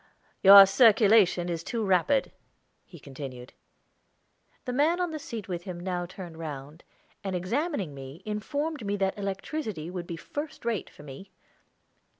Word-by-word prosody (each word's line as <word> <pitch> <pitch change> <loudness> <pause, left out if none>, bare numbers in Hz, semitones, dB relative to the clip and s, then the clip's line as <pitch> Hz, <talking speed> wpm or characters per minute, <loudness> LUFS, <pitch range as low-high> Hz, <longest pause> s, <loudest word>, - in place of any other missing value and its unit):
"Your 195 0 +11
circulation 205 -4 +4
is 165 -2 -3
too 230 +1 -3
rapid," 195 +9 +2 0.6
he 175 - -13
continued. 135 -3 -9 1.1
The 250 - -3
man 310 +7 +2
on 355 -2 -1
the 310 - -5
seat 230 -7 -7
with 175 -2 -5
him 180 -3 -6
now 175 -1 -3
turned 175 -3 -10
round, 150 0 -8 0.4
and, 190 -2 -3
examining 200 - -2
me, 135 +2 -10
informed 285 +7 -3
me 200 0 -1
that 195 -1 0
electricity 195 - -4
would 180 -2 -6
be 170 - -5
first 290 - -7
rate 230 -5 -2
for - - -15
me. 150 +7 -11
190 Hz, 150 wpm, -27 LUFS, 170-235 Hz, 1.1 s, Your